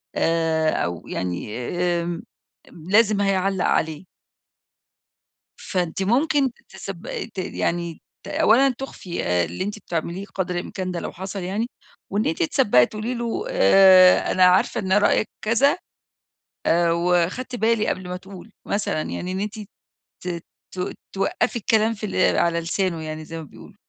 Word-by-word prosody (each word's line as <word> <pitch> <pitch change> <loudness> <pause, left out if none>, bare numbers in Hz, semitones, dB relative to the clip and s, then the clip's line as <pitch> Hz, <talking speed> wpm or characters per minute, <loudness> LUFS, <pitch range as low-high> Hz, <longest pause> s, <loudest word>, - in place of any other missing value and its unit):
آآ 165 -1 +1
أو 85 0 -3
يعني 90 +4 -4
آمم 175 +5 -2 0.5
أم 160 - -14
لازم 210 0 +4
هيعلّق 195 -1 +1
عليه. 160 +3 0 1.5
فأنتِ 180 0 -2
ممكن 270 +6 +2 0.2
تسبق 195 +2 -6
ت - - -12
يعني 170 -2 -2 0.2
ت - - -11
أولًا 265 +5 +4
تُخفّي 195 -9 -5
آآ 90 0 +2
اللي 85 - -4
أنتِ 210 +2 -4
بتعمليه 170 0 -4
قدر 185 -2 -2
الإمكان 185 +1 -4
ده 175 -1 -3
لو - - -5
حصل 190 +2 -6
يعني 200 +6 -2 0.5
وإن 205 +2 0
أنتِ 160 - 0
تسبّقي 165 - +4
تقولي 220 +3 -4
له 235 - -3
آآ 190 - +6
أنا 185 - +5
عارفة 185 +6 +4
إن 190 -2 -2
رأيِك 205 +1 +3 0.2
كذا 235 +8 +3 0.9
آآ 170 0 +3
وخدْت 180 +9 0
بالي 225 -1 +1
قبل 185 -1 -3
ما 180 - -3
تقول، 190 +2 -12 0.2
مثلًا 200 -6 -1
يعني 180 +3 -4
إن 190 - -3
أنتِ 210 +2 -4 0.6
ت - - -7 0.5
ت 180 0 -3 0.2
توقّفي 195 - 0
الكلام 220 0 +2
في 215 -1 -6
اللي 190 -2 +2
على 170 0 +2
لسانه 170 0 -1
يعني 155 0 -6
زي 165 +1 -7
ما 165 - -6
بيقولوا. 145 - -14
185 Hz, 150 wpm, -23 LUFS, 170-210 Hz, 1.5 s, آآ